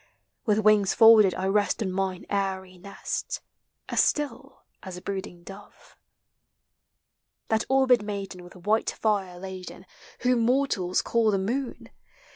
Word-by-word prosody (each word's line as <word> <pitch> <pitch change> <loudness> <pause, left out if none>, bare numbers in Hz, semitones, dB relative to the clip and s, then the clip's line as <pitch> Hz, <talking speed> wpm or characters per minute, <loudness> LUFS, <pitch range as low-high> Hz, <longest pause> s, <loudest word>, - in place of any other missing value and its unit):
With 210 -1 +3
wings 215 -2 +3
folded 220 -5 +7
I 185 - -3
rest 205 +3 +1
on 190 - -3
mine 190 -1 -3
airy 190 -2 -3
nest, 200 +2 -5 0.5
As - - -1
still 275 -2 -3 0.2
as 185 -2 -8
a - - -9
brooding 190 -3 -6
dove. 195 +3 -10
i - - -22
fa - - -27 1.5
That 220 0 +1
orbed 260 -3 +4
maiden 200 -3 -6
with 175 - -14
white 210 +5 0
fire 195 -5 -1
laden. 185 0 -9 0.4
Whom 250 0 +2
mortals 230 -7 +1
call 230 -2 +2
the 200 - +2
moon. 240 +7 -4
200 Hz, 140 wpm, -26 LUFS, 190-225 Hz, 1.5 s, folded